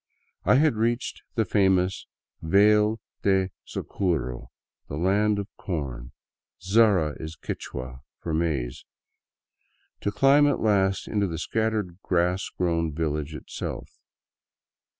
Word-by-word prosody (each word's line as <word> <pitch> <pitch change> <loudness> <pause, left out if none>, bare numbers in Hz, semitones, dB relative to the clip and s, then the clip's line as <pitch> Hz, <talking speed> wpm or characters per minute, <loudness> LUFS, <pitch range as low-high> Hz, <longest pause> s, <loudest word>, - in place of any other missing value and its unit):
I - - +5
had 145 -4 +3
reached 115 +2 -1
the 110 - +2
famous 95 -1 +2 0.3
Vale 105 +5 +4 0.2
of 95 -1 +3 0.2
Zaraguro, 65 -10 -2 0.4
the 70 - -5
Land 100 +5 +2
of 100 -1 -3
Corn, 65 -9 -4 0.3
— - - -68 0.2
sara 100 -9 +5
is 80 +1 -7
Qui^hua*for 65 +5 -7
maize 75 -7 -1 0.6
— - - -45
to 100 - 0
climb 135 +7 +5
at 145 - +1
last 95 -3 +2
into 100 -2 0
the 80 -2 -4
scattered 105 -2 -1
grass 90 +1 0
grown 85 -2 0
village 75 -1 -2
itself. 75 - -7
95 Hz, 115 wpm, -26 LUFS, 80-105 Hz, 0.6 s, I